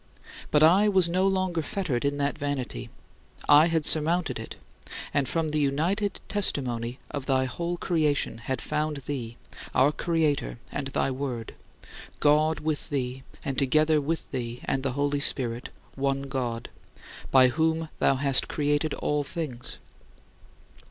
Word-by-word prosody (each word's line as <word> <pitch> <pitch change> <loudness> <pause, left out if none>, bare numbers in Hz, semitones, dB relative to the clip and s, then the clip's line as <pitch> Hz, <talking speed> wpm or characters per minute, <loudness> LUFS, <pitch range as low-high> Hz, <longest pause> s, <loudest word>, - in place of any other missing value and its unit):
But 150 0 +4
I 190 +6 +6
was 190 -4 +4
no 185 +3 +1
longer 185 -3 0
fettered 155 - -2
in 145 0 0
that 140 0 0
vanity. 145 -4 -4 0.6
I 150 +3 +7
had 165 -2 +1
surmounted 165 +2 +3
it, - - -8 0.6
and 140 -2 +1
from 165 -2 -1
the 150 0 0
united 170 +9 0
testimony 125 - 0
of 140 -2 -5
thy 130 -1 +2
whole 170 +7 -3
creation 155 -9 0
had 130 +2 -3
found 150 0 -1
thee, 120 -5 -5 0.4
our 135 +3 +5
Creator, 155 -5 0
and 140 -1 -3
thy 135 0 0
Word 130 -4 -4 0.7
God 155 +2 +3
with 155 -1 -3
thee, 130 -2 -3 0.2
and 135 -2 -1
together 155 +3 +3
with 160 +3 -3
thee 120 -2 -4
and 135 - 0
the 135 -1 -2
Holy 145 +1 0
Spirit, 125 -4 0 0.2
one 135 0 -1
God 125 -4 -3 0.6
by 130 -1 +6
whom 160 +3 0
thou 135 - +3
hast 135 -1 +4
created 145 +1 0
all 150 0 -1
things. 140 -5 -5
145 Hz, 145 wpm, -27 LUFS, 130-160 Hz, 0.7 s, I